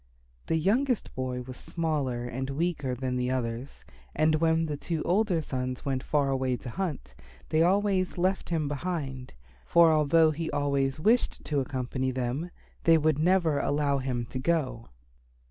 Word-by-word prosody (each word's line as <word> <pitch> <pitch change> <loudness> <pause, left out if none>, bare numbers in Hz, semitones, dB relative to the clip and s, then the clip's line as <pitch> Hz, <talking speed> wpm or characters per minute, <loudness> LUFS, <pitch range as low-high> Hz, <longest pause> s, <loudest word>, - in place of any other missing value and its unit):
The - - +1
youngest 235 - +1
boy 125 -1 -3
was 130 0 -9
smaller 145 -8 -2
and 130 +2 -4
weaker 145 -3 -1
than 125 0 -2
the 125 0 0
others, 125 0 -4 0.3
and 155 0 +3
when 165 0 +2
the 150 -2 -3
two 160 +2 -3
older 185 -2 +2
sons 130 -2 -4
went 135 -2 -1
far 140 -1 +1
away 130 -2 0
to 120 - -8
hunt, 155 - -4 0.4
they 155 - +2
always 190 +1 +2
left 185 +2 0
him 160 -3 0
behind, 140 - -4 0.3
for 165 - +5
although 155 +1 +4
he 160 +1 -3
always 140 -1 0
wished 225 +9 +1
to 145 -2 0
accompany 130 -1 -2
them 130 +6 -2 0.3
they 165 -1 +6
would 155 -1 +1
never 170 -3 +3
allow 145 -1 +1
him 125 -2 -2
to 130 - -3
go. 130 - -1
145 Hz, 160 wpm, -28 LUFS, 130-165 Hz, 0.4 s, they